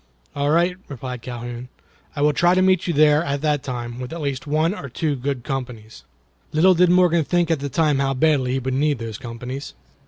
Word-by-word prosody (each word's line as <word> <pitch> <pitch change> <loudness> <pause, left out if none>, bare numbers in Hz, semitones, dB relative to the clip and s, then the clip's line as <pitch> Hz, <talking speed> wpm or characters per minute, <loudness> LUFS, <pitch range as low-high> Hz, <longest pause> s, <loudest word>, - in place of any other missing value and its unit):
"All 145 0 0
right," 170 +3 +2
replied 125 -2 -6
Calhoun, 120 0 -7 0.5
"I 145 - -1
will 150 0 +4
try 175 +4 +3
to 185 - +3
meet 185 -2 +2
you 170 - 0
there 150 +1 +5
at 140 -1 -2
that 150 -2 +1
time, 120 -2 -5
with 125 0 -6
at 170 - -5
least 140 -2 -3
one 155 +4 +1
or 140 -10 -7
two 150 +3 -1
good 135 -1 -3
companies." 120 - -6 0.5
Little 180 +5 +5
did 180 0 +4
Morgan 175 -2 +4
think 175 +3 +1
at 160 - +1
the 140 +1 -4
time 150 0 +1
how 135 -1 0
badly 130 -3 +2
he - - +1
would 130 0 -3
need 145 +1 +1
those 115 -2 -6
companies. 125 +3 -7
140 Hz, 215 wpm, -22 LUFS, 125-160 Hz, 0.5 s, there